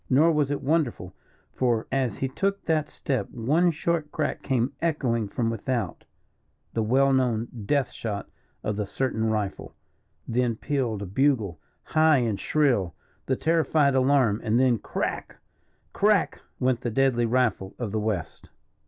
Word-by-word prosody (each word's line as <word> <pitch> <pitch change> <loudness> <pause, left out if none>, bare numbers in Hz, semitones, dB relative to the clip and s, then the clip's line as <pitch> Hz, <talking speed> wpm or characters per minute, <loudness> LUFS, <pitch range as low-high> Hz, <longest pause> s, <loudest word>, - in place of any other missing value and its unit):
Nor 150 +6 +5
was 150 -3 +1
it 145 0 -2
wonderful, 130 - 0 0.4
for 120 -3 +1
as 130 -5 0
he 135 - -1
took 195 +8 -2
that 155 -2 +1
step, 130 -8 -2
one 150 +10 +2
short 165 -1 -1
crack - - -2
came 130 0 0
echoing 125 -9 0
from 115 +3 -1
without, 115 -4 -3 0.7
the 115 - 0
well 135 +5 +3
known 120 -3 +1 0.2
death 140 -3 +1
shot 105 -3 -5 0.4
of 105 -1 -2
the 105 -2 -2
certain 115 -1 -1
rifle 105 -3 -2 0.5
then 120 0 +1
pealed 115 -5 -2
a - - -4
bugle, 105 - +1 0.2
high 155 -1 +4
and 115 -5 0
shrill 120 - +1 0.3
the 130 - +2
terrified 160 -2 +2
alarm 130 -5 +3
and 110 +1 +2
then 125 -3 +3
crack! - - -4 0.6
crack! - - +2 0.2
went 125 -1 +1
the 120 - -2
deadly 120 -1 +2
rifle 115 -6 0
of 115 -5 -4
the 110 - -1
west. 105 -7 -3
125 Hz, 150 wpm, -26 LUFS, 110-140 Hz, 0.7 s, Nor